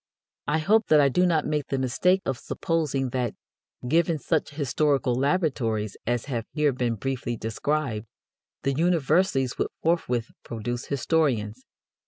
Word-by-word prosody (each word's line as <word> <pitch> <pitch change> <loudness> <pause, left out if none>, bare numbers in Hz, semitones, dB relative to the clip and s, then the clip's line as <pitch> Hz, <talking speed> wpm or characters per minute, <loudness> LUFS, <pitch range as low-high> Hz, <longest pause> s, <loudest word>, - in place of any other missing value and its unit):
I 150 - +2
hope 215 +8 +3
that 155 - +6
I 140 -1 +5
do 180 +7 +3
not 160 -3 +2
make 150 -2 -1
the 135 - -1
mistake 180 +9 +2
of 135 -3 -2
supposing 150 -6 -1
that, 125 -3 -2 0.5
given 165 +3 +2
such 155 +2 0
historical 145 -2 +1
laboratories 130 - 0
as 120 -1 0
have 120 -5 -3
here 150 -2 +2
been 125 -2 -1
briefly 120 0 -3
described, 115 0 -2 0.6
the 140 - +1
universities 160 -3 +2
would - - +1 0.2
forthwith 125 -9 0
produce 120 +2 -4
historians. 130 -6 0
135 Hz, 140 wpm, -26 LUFS, 120-160 Hz, 0.6 s, that